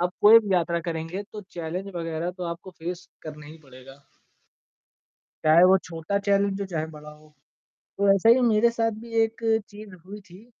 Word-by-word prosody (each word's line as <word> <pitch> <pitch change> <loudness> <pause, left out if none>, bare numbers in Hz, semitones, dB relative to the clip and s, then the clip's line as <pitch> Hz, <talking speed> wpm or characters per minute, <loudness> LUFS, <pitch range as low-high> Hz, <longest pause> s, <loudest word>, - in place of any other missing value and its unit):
आप 180 +1 0
कोई 220 +2 +9
भी 205 -4 -3
यात्रा 170 -1 0
करेंगे 165 +3 -5
तो 210 - -7
चैलेंज 175 +3 -5
वगैरह 165 0 -3
तो 180 - -5
आपको 185 +3 -11
फेस 175 +2 -6
करना 150 -1 -10
ही 160 +2 -12
पड़ेगा। 135 +1 -15 1.4
चाहे 160 +3 +6
वो 190 - +6
छोटा 165 +4 -3
चैलेंज 200 0 +1
हो 200 - -3
चाहे 160 -1 -2
बड़ा 150 0 -11
हो, 150 0 -19 0.7
तो 200 0 +4
ऐसे 195 +4 +3
ही 255 - +1
मेरे 220 +2 +4
साथ 225 -1 0
भी 230 -1 -11
एक 225 +1 -5 0.3
चीज़ 205 -2 -12
हुई 205 +2 -9
थी। 190 +3 -17
180 Hz, 180 wpm, -25 LUFS, 160-200 Hz, 1.4 s, कोई